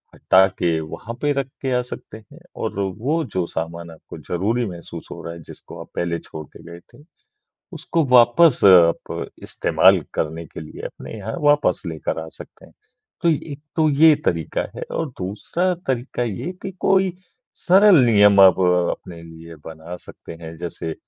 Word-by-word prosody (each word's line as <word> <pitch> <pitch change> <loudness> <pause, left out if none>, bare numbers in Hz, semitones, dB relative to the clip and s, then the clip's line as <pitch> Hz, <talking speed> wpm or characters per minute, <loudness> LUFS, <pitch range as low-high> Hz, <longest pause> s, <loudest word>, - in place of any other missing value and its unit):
हटा 95 +1 +4
के 85 -2 +1
वहाँ 105 +9 -8
पे 145 - +1
रख 140 -2 -2
के 135 -1 -2
आ - - +1
सकते 120 -3 -9
हैं। 110 -2 -17 0.2
और - - -4 0.2
वो 155 +7 0
जो 90 - +1
सामान 85 +1 -6
आपको 80 - -12
ज़रूरी 110 +7 -1
महसूस 85 -2 -9
हो 85 -1 -8
रहा 85 - -6
है 85 - -11
जिसको - - -12
आप - - -12
पहले 85 -1 -2
छोड़ 80 -1 -10
के - - -16
गए 85 - -10
थे, 145 - -17 0.7
उसको 165 -2 -1
वापस 125 +4 +5
आप 90 -4 +4 0.2
इस्तेमाल - - +3
करने 80 +2 -3
के - - -10
लिए 80 - -10
अपने - - -10
यहाँ 105 +2 -6
वापस 145 0 +2
लेकर 80 -1 -4
आ - - -10
सकते - - -13
हैं। - - -21 0.5
तो 170 - +3
एक 150 -2 -4 0.2
तो 160 -2 +3
ये 155 +2 +6
तरीका 85 -2 -1
है - - -7 0.2
और 165 - -2
दूसरा 165 - -2
तरीका 125 -1 -2
ये 115 - -4
कि 195 - -4
कोई 190 -1 +2 0.4
सरल 195 +1 +5
नियम 105 -3 +5
आप 95 -2 +7
अपने 90 -1 0
लिए 80 0 -12
बना 80 +2 -8
सकते - - -12
हैं 80 0 -8
जैसे 85 -1 -5
100 Hz, 175 wpm, -21 LUFS, -, 0.7 s, आप